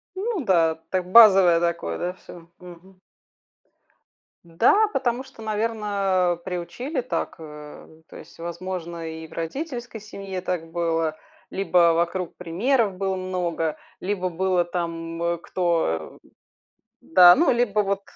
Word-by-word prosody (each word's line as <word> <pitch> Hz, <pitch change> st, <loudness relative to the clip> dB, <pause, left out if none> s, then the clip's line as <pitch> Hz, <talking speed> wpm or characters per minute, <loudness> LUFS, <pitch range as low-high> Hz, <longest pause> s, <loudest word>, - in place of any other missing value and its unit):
Ну 400 Hz, -, -2 dB
да, 165 Hz, -4 st, +3 dB
так 185 Hz, -1 st, -2 dB
базовое 195 Hz, -7 st, +8 dB
такое, 170 Hz, -, -2 dB
да, 180 Hz, +1 st, -3 dB
всё, 170 Hz, -2 st, -14 dB
мгм. 180 Hz, +1 st, -15 dB, 1.4 s
Да, 235 Hz, -, +3 dB
потому 255 Hz, -1 st, -1 dB
что, 225 Hz, -, -15 dB
наверно, 205 Hz, -5 st, 0 dB
приучили 240 Hz, -, -4 dB
так, 250 Hz, -, -3 dB
э. 150 Hz, 0 st, -12 dB
То -, -, -14 dB
есть, -, -, -14 dB
возможно, 170 Hz, -1 st, -5 dB
и 160 Hz, 0 st, -7 dB
в 160 Hz, -, -16 dB
родительской 240 Hz, -, -5 dB
семье 195 Hz, -3 st, -7 dB
так 165 Hz, -3 st, -4 dB
было. 165 Hz, -2 st, -1 dB, 0.4 s
Либо 175 Hz, -3 st, +3 dB
вокруг 170 Hz, +1 st, -1 dB
примеров 205 Hz, +5 st, 0 dB
было 190 Hz, 0 st, -2 dB
много, 175 Hz, -4 st, -2 dB, 0.2 s
либо 185 Hz, -1 st, -2 dB
было 180 Hz, +1 st, +1 dB
там 170 Hz, -1 st, -3 dB
кто 165 Hz, -, -1 dB, 0.8 s
Да, 175 Hz, +1 st, +7 dB
ну 330 Hz, -2 st, +3 dB
либо 225 Hz, -3 st, +1 dB
вот 200 Hz, 0 st, -1 dB
180 Hz, 120 wpm, -24 LUFS, 170-205 Hz, 1.4 s, базовое